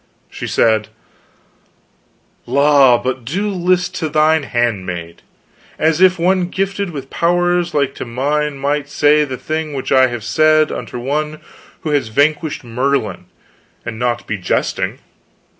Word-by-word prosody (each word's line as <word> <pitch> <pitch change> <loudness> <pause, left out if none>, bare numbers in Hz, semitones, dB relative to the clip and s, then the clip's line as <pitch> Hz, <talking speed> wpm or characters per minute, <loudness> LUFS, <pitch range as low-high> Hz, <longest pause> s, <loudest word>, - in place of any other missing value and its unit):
She - - -6
said: 110 -1 +2 1.6
"La, 140 -1 +5
but 125 +1 -3
do 190 - -2
list 180 -1 0
to 160 - -2
thine 155 +1 +3
handmaid! 95 -10 -3 0.6
as 160 +2 +1
if 185 0 +5
one 180 +1 +1
gifted 195 0 -2
with 140 -5 -8
powers 175 0 +1
like 140 -2 +1
to - - -6
mine 140 +4 -1
might 140 +1 -1
say 150 0 +3
the 130 -2 -5
thing 155 0 -4
which 135 - -4
I 130 -1 +5
have 120 -3 -5
said 155 +3 +3
unto - - -6
one 150 +5 -2 0.4
who 155 - -3
has 145 -5 +1
vanquished 150 +6 0
Merlin, 120 -5 -1 0.6
and 110 - -6
not 120 -1 -1
be 105 - -3
jesting. 90 - -1
145 Hz, 140 wpm, -17 LUFS, 125-160 Hz, 1.6 s, La